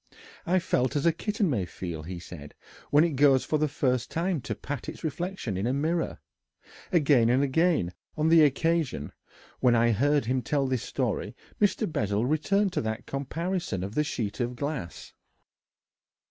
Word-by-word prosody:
"I 185 Hz, +2 st, +3 dB
felt 130 Hz, -8 st, 0 dB
as 145 Hz, -, 0 dB
a 170 Hz, -, +6 dB
kitten 210 Hz, +2 st, -1 dB
may 120 Hz, -, 0 dB
feel," 85 Hz, -2 st, -6 dB
he 90 Hz, +3 st, -6 dB
said, 80 Hz, -4 st, -10 dB, 0.3 s
"when 150 Hz, +2 st, +5 dB
it 170 Hz, -, +1 dB
goes 135 Hz, -2 st, +4 dB
for 155 Hz, -, 0 dB
the 155 Hz, -, +2 dB
first 130 Hz, -4 st, 0 dB
time 170 Hz, -2 st, -1 dB
to -, -, -4 dB
pat 145 Hz, -3 st, -5 dB
its -, -, -9 dB
reflection 160 Hz, -, -3 dB
in 100 Hz, +5 st, -1 dB
a 125 Hz, -, +1 dB
mirror." 160 Hz, +4 st, -1 dB, 0.7 s
Again 140 Hz, -9 st, +4 dB
and 130 Hz, +3 st, +3 dB
again, 140 Hz, -, +2 dB, 0.2 s
on 155 Hz, +1 st, +2 dB
the 165 Hz, -1 st, +7 dB
occasion 150 Hz, -, +1 dB, 0.5 s
when 125 Hz, -2 st, +4 dB
I 120 Hz, 0 st, +4 dB
heard 145 Hz, +5 st, +2 dB
him 130 Hz, +2 st, 0 dB
tell 140 Hz, +3 st, 0 dB
this 130 Hz, -3 st, -1 dB
story, -, -, -2 dB, 0.3 s
Mr. 210 Hz, +2 st, +2 dB
Bessel 105 Hz, -, -1 dB
returned 190 Hz, +7 st, +1 dB
to -, -, 0 dB
that 110 Hz, +1 st, -4 dB
comparison 160 Hz, -, -3 dB
of 100 Hz, +2 st, -5 dB
the 150 Hz, -, +2 dB
sheet 110 Hz, -8 st, -3 dB
of 120 Hz, 0 st, -1 dB
glass. 135 Hz, -, -5 dB
140 Hz, 175 wpm, -27 LUFS, 115-165 Hz, 0.7 s, the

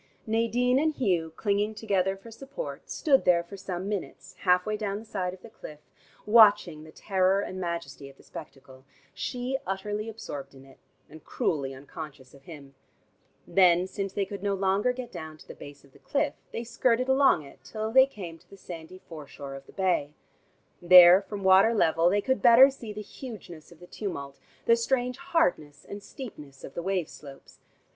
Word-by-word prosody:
Nadine 230 Hz, +3 st, +1 dB
and 310 Hz, +1 st, 0 dB
Hugh, 175 Hz, -9 st, 0 dB
clinging 205 Hz, +1 st, -1 dB
together 195 Hz, -3 st, 0 dB
for 225 Hz, +4 st, -14 dB
support, 275 Hz, -, -8 dB
stood 280 Hz, -5 st, +2 dB
there 170 Hz, -1 st, +3 dB
for 170 Hz, +4 st, -11 dB
some 190 Hz, -1 st, -5 dB
minutes, 205 Hz, -3 st, -6 dB
half 180 Hz, -1 st, +3 dB
way 215 Hz, -, -1 dB
down 205 Hz, -2 st, -3 dB
the 220 Hz, -, -10 dB
side 190 Hz, -4 st, -3 dB
of 185 Hz, 0 st, -14 dB
the 230 Hz, -, -11 dB
cliff, 150 Hz, -8 st, -11 dB, 0.5 s
watching 205 Hz, -8 st, +5 dB
the 155 Hz, -, -13 dB
terror 190 Hz, +1 st, +1 dB
and 185 Hz, -2 st, -5 dB
majesty 170 Hz, -5 st, -5 dB
of 135 Hz, -, -18 dB
the -, -, -19 dB
spectacle, 130 Hz, -1 st, -12 dB, 0.3 s
she 255 Hz, +1 st, -3 dB
utterly 210 Hz, +3 st, -3 dB
absorbed 140 Hz, -11 st, -8 dB
in 135 Hz, 0 st, -15 dB
it 135 Hz, -1 st, -19 dB, 0.3 s
and 155 Hz, 0 st, -14 dB
cruelly 140 Hz, -5 st, -2 dB
unconscious 140 Hz, -1 st, -10 dB
of 140 Hz, -1 st, -18 dB
him. 145 Hz, -5 st, -12 dB, 0.7 s
Then, 180 Hz, -2 st, +4 dB
since 195 Hz, +1 st, -5 dB
they 200 Hz, +1 st, -1 dB
could 200 Hz, +1 st, -8 dB
no 200 Hz, -1 st, 0 dB
longer 195 Hz, +5 st, +1 dB
get 250 Hz, -1 st, -7 dB
down 160 Hz, -3 st, -8 dB
to -, -, -17 dB
the -, -, -9 dB
base 145 Hz, 0 st, -12 dB
of 140 Hz, -, -21 dB
the -, -, -19 dB
cliff, 290 Hz, 0 st, -1 dB, 0.2 s
they 230 Hz, -, -4 dB
skirted 235 Hz, +1 st, 0 dB
along 265 Hz, -, +4 dB
it 140 Hz, -, -15 dB
till 220 Hz, 0 st, -5 dB
they 260 Hz, +2 st, +6 dB
came 175 Hz, -10 st, -9 dB
to -, -, -28 dB
the 195 Hz, -, -14 dB
sandy 175 Hz, -1 st, -10 dB
foreshore 145 Hz, -3 st, -9 dB
of 135 Hz, 0 st, -11 dB
the -, -, -14 dB
bay. 175 Hz, -6 st, -1 dB, 0.7 s
There 180 Hz, +1 st, +9 dB
from 200 Hz, 0 st, -7 dB
water 190 Hz, +4 st, +5 dB
level 165 Hz, -3 st, +3 dB
they 205 Hz, +2 st, +1 dB
could 260 Hz, +4 st, -1 dB
better 250 Hz, +3 st, +8 dB
see 235 Hz, -5 st, -9 dB
the 210 Hz, 0 st, -7 dB
hugeness 200 Hz, -, -11 dB
of 170 Hz, -, -16 dB
the 175 Hz, -, -13 dB
tumult, 140 Hz, -9 st, -6 dB, 0.3 s
the 230 Hz, -, +5 dB
strange 245 Hz, +1 st, -1 dB
hardness 155 Hz, -, -1 dB
and 200 Hz, 0 st, -8 dB
steepness 150 Hz, -, -11 dB
of 135 Hz, -, -9 dB
the -, -, -4 dB
wave 185 Hz, -2 st, -1 dB
slopes. 140 Hz, -2 st, -14 dB
190 Hz, 190 wpm, -27 LUFS, 160-225 Hz, 0.7 s, There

